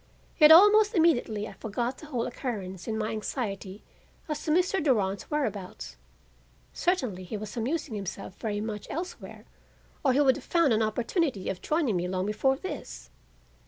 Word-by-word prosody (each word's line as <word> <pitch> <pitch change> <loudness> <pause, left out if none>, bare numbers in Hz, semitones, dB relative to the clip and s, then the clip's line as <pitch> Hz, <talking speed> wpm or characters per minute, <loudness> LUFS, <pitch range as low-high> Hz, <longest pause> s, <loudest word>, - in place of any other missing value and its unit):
Yet 305 0 +9
almost 415 +5 +7
immediately 240 - +2
I 205 - -10
forgot 235 +6 -3
the 310 - -11
whole 245 -5 -2
occurrence 200 -8 -5
in 220 -1 -2
my 215 0 -2
anxiety 210 -3 -4 0.4
as 300 -2 -4
to 310 - 0
Mr. 360 +1 +2
Durand's 200 -9 0
whereabouts. 215 -11 -3 0.8
Certainly 250 - -1
he 210 - -5
was 210 +2 -7
amusing 245 +3 -2
himself 195 -2 -6
very 205 -2 -2
much 210 -1 -5
elsewhere 350 +4 -6 0.6
or 270 -3 +3
he 270 - +2
would 265 -2 +4
have - - -10
found 335 -8 +3
an 220 - +2
opportunity 230 - -1
of 180 - -4
joining 300 - +1
me 175 +1 -1
long 185 0 -2
before 265 +6 +1
this. 165 - -7
230 Hz, 160 wpm, -28 LUFS, 205-305 Hz, 0.8 s, Yet